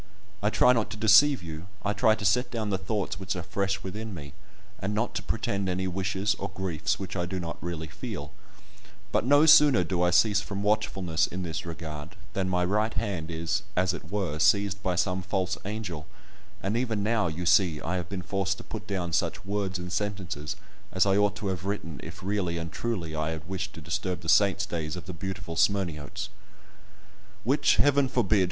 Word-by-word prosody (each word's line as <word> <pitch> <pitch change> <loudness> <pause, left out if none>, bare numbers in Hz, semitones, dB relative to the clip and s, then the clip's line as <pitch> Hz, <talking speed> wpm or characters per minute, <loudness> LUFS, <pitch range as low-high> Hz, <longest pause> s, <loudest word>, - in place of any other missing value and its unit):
I 105 - +3
try 125 +3 +5
not 115 -3 0
to - - -6
deceive 110 +4 +6
you—I 95 +5 -5
try 110 +1 +4
to 105 - -6
set 125 +7 +3
down 110 -3 -2
the 95 - 0
thoughts 100 0 -2
which 95 -1 -2
are 90 - -4
fresh 100 +1 -1
within 105 +2 -5
me, 70 -4 -9 0.5
and 100 +2 -2
not 115 +3 0
to - - -2
pretend 100 -1 -1
any 95 +1 -1
wishes, 95 +2 0
or - - -3
griefs, 95 -5 -1
which 95 -1 -6
I 90 -1 -1
do 95 +1 -3
not 85 -1 -5
really 85 -2 -4
feel; 75 - -6 0.8
but 120 - +1
no 145 +3 +6
sooner 150 -4 +7
do 90 -3 -1
I 90 - +4
cease 100 +3 +4
from 100 -1 -4
watchfulness 100 -6 +1
in 95 +1 -5
this 85 0 -4
regard, 80 0 -7 0.2
than 95 -1 0
my 90 -1 +2
right 105 +4 +1
hand 100 -7 -2
is, 85 +5 -1
as 90 0 +2
it 80 -3 -8
were, 95 -7 -1
seized 100 +3 +3
by 90 -2 0
some 90 +1 +1
false 95 0 -1
angel, 95 -7 -4 0.6
and 100 +3 0
even 115 -4 0
now, 110 -2 +2
you 85 +2 -4
see, 85 -4 +4
I 90 +4 -2
have 85 -2 -4
been 95 -2 -4
forced 100 +1 -1
to - - -9
put 105 - -7
down 90 -4 -2
such 90 -1 0
words 100 -2 -1
and 90 0 -6
sentences 95 -7 -3 0.4
as 95 +1 +3
I 95 -1 +3
ought 105 0 +3
to 105 -1 -4
have 95 -1 -3
written 90 -6 -3
if 90 +4 -9
really 95 -3 -1
and 85 0 -4
truly 95 -9 -3
I 80 0 -1
had 80 -1 -5
wished 95 +1 -4
to 85 - -9
disturb 90 +3 -2
the 80 - -4
saints' 100 +1 +4
days 80 -4 -3
of 90 - -7
the 90 - -6
beautiful 95 0 -5
Smyrniotes! 95 0 0 1.1
Which, 135 +6 +3
Heaven 140 -1 +4
forbid! 110 -5 +2
95 Hz, 200 wpm, -28 LUFS, 85-105 Hz, 1.1 s, sooner